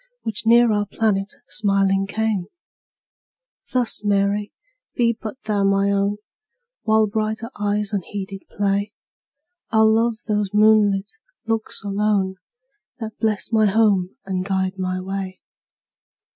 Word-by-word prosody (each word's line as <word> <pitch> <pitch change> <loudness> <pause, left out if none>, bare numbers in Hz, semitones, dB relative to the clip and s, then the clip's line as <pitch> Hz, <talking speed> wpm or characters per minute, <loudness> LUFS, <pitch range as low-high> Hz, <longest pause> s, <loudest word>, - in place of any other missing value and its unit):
Which 220 0 -4
near 235 0 +6
our 205 0 0
planet 200 -2 0 0.2
smiling 195 0 +1
came; 210 -3 -1 1.2
Thus, 245 -4 +1
Mary, 205 0 +1 0.4
be 235 -1 +2
but 215 +1 -5
thou 210 -2 0
my 195 0 +3
own; 200 +1 +1 0.6
While 220 0 +3
brighter 220 +2 -2
eyes 205 0 -1
unheeded 195 0 -5
play, 200 +1 -1 0.8
I'll 220 -1 +4
love 230 0 +2
those 210 -2 -1
moonlight 210 -2 +4 0.3
looks 225 -2 -2
alone, 200 -2 0 0.6
That 220 -2 -6
bless 220 0 0
my 220 -2 +4
home 200 -2 +2
and 185 -1 -2
guide 190 0 -1
my 185 0 -1
way. 190 0 -5
205 Hz, 115 wpm, -22 LUFS, 195-220 Hz, 1.2 s, near